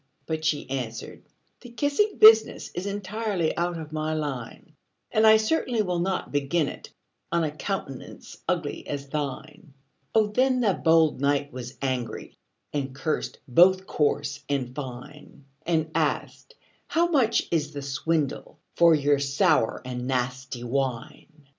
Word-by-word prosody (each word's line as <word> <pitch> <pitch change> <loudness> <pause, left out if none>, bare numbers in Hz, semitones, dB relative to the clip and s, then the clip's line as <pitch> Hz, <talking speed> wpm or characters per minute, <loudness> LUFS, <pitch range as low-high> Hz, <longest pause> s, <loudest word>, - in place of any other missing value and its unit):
But 160 -1 -3
she 155 -2 0
answered, 120 -4 -5 0.4
"The 245 - -12
kissing 285 - 0
business 220 0 +6
Is 180 +3 -4
entirely 200 -3 -2
out 175 0 -1
of 155 -2 -8
my 155 0 -1
line; 140 -7 -5 0.4
And 220 0 +4
I 220 0 +8
certainly 225 0 0
will 180 -3 -1
not 185 +1 -2
begin 145 +2 +1
it - - -8 0.4
On 170 -1 +2
a 155 - -1
countenance 150 -4 -6
ugly - - -2
as 140 -1 -5
thine!" 150 +1 -5 0.4
Oh, 220 -1 +5
then 255 +5 +2
the 210 -5 +3
bold 160 -4 +3
knight 145 -1 +1
was 125 0 -8
angry, 130 -3 -3 0.4
And 135 -2 -3
cursed 155 +2 -2
both 185 +8 +5
coarse 145 -2 -1
and 130 -3 -1
fine; 140 +1 -9 0.2
And 160 -2 +1
asked, - - -2 0.3
"How 335 +1 +2
much 250 -7 +2
is 155 -3 0
the 140 -1 -5
swindle 140 +2 -2 0.2
For 170 -1 +6
your 145 -1 +2
sour 140 - +2
and 125 -1 -4
nasty 130 -1 -2
wine?" 135 +4 -4
155 Hz, 140 wpm, -26 LUFS, 135-185 Hz, 0.4 s, I